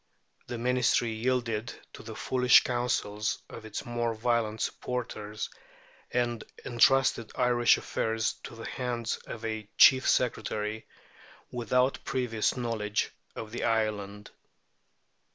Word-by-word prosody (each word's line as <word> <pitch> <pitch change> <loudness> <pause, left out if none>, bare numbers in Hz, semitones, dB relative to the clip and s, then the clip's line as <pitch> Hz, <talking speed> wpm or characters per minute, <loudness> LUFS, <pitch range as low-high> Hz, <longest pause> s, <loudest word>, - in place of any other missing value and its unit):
The 120 - -4
Ministry 120 -1 +2
yielded 115 -1 -1 0.2
to - - -10
the 110 -1 -8
foolish 125 +4 +5
counsels 120 -4 -1
of 110 - -10
its 110 - -5
more 120 -1 -1
violent 110 -1 0
supporters, 110 -4 -3 0.6
and 120 -2 -1 0.2
entrusted 120 -1 +3
Irish 120 -1 +4
affairs 110 0 -1
to - - -9
the 115 - -8
hands 120 -2 -2
of 115 0 -6
a 110 -1 -4
Chief 130 0 +7
Secretary 110 -3 0 0.6
without 125 +2 +1
previous 125 -3 0
knowledge 110 -4 -1 0.2
of 110 -1 -7
the 120 - -4
island. 105 -3 -1
115 Hz, 115 wpm, -29 LUFS, 110-125 Hz, 0.6 s, Chief